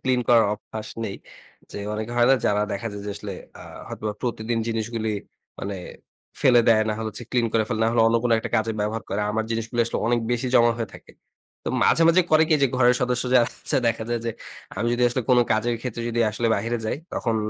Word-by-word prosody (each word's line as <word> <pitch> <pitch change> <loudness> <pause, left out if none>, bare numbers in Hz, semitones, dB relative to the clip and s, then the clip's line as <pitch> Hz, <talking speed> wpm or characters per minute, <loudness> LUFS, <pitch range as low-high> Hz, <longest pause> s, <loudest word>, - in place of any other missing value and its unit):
Clean 130 -1 +1
করার 115 -2 +6
অভ্যাস 110 +1 -8 0.2
নেই। 100 -2 -4 0.5
যে, - - -7
অনেকে 110 +2 -4
হয় 120 0 +4
না, - - +7
যারা 105 0 +2
দেখা 100 +3 -4
যায় 100 0 -7
যে, - - -3
আসলে 100 -1 -6 0.3
আ - - -9 0.3
হয়তোবা 105 -1 -4
প্রতিদিন 115 -1 -2
জিনিসগুলি 110 -1 -2 0.5
মানে 100 0 -4 0.6
ফেলে 120 -2 +6
দেয়, 110 -1 +6
না - - +1
হলে 110 -1 -3
হচ্ছে 120 +4 -7
ক্লিন 120 -2 +2
করে 110 -1 +2
ফেলে, 115 -3 -2
না - - +3
হলে 115 -1 +4
অন্য 115 +1 +3
কোনো 120 - +2
একটা - - -5
কাজে 110 0 0
ব্যবহার 110 +2 -2
করা? 105 +1 -1
আমার 110 0 0
জিনিসগুলি 115 +1 -2
আসলে 115 - -3
অনেক 120 0 +2
বেশি 120 +1 0
জমা 120 -1 +6
হয়ে 115 -3 -3
থাকে। - - -14 0.5
তো - - -2 0.2
মাঝে, 165 - +4
মাঝে 180 +2 +5
করে 155 0 +6
কি? 155 - +4
যে, - - +6
ঘরের 125 -1 +5
সদস্য 125 0 0
যারা 120 -2 +6 0.2
আছে, - - +1
দেখা 115 0 -1
যায় 120 -1 0
যে, - - 0 0.5
আমি 115 +4 -1
যদি 120 +1 0
আসলে 125 +1 -2
কোনো 125 -1 +6
কাজের 115 +2 0
ক্ষেত্রে 120 -2 -5
যদি 120 0 -1
আসলে 115 +2 -2
বাইরে 115 +1 -1
যাই, 110 - -1 0.2
তখন 115 - -1
115 Hz, 225 wpm, -24 LUFS, 110-120 Hz, 0.6 s, না